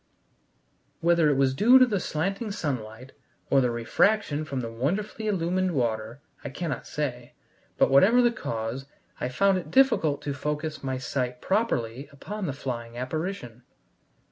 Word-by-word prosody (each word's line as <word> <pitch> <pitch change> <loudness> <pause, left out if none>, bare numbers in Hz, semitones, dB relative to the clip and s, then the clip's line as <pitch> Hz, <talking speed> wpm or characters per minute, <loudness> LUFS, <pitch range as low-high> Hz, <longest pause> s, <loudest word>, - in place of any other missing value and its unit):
Whether 170 -2 +4
it 140 - +2
was 135 -1 +3
due 235 - +6
to 255 - +7
the 210 -6 -1
slanting 195 +7 -2
sunlight, 130 - -4 0.4
or 135 - +5
the 125 - +2
refraction 150 - +1
from 140 -4 -3
the 115 -1 -5
wonderfully 195 - -2
illumined 185 -2 0
water, 115 0 -2 0.2
I 140 - -4
cannot 155 +3 -4
say, 125 -5 -4 0.4
but, - - +3
whatever 195 - +6
the 240 -1 +4
cause, 115 - -4 0.3
I 125 - -2
found 195 +8 +2
it - - -9
difficult 240 - +3
to 145 - -2
focus 150 +2 -4
my 130 -1 -2
sight 125 0 -3
properly 140 - -1
upon 195 +8 -6
the 140 - -2
flying 120 -4 -6
apparition. 130 - -4
145 Hz, 150 wpm, -26 LUFS, 125-190 Hz, 0.4 s, to